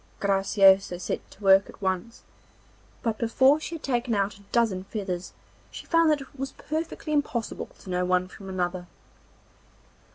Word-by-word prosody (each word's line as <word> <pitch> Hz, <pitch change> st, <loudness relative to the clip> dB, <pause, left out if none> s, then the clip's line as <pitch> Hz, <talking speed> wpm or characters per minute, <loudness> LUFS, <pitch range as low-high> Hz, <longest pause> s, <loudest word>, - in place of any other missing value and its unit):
Graciosa 195 Hz, -1 st, +4 dB
set 180 Hz, -, -4 dB
to 205 Hz, -, -16 dB
work 195 Hz, 0 st, +6 dB
at -, -, -13 dB
once, 190 Hz, +4 st, -3 dB, 0.8 s
but 225 Hz, -2 st, -1 dB
before 260 Hz, +5 st, +4 dB
she 330 Hz, +1 st, -5 dB
had 320 Hz, -, -9 dB
taken 245 Hz, -3 st, 0 dB
out 200 Hz, 0 st, 0 dB
a -, -, -18 dB
dozen 220 Hz, -6 st, +1 dB
feathers 190 Hz, -4 st, -4 dB, 0.4 s
she -, -, -9 dB
found 330 Hz, -1 st, +4 dB
that 300 Hz, -2 st, +2 dB
it 270 Hz, 0 st, -13 dB
was 270 Hz, 0 st, -4 dB
perfectly 315 Hz, 0 st, -4 dB
impossible 270 Hz, -6 st, -1 dB
to -, -, -13 dB
know 180 Hz, 0 st, 0 dB
one 180 Hz, 0 st, +1 dB
from 195 Hz, +1 st, -11 dB
another. 180 Hz, -1 st, -2 dB
205 Hz, 160 wpm, -26 LUFS, 190-265 Hz, 0.8 s, work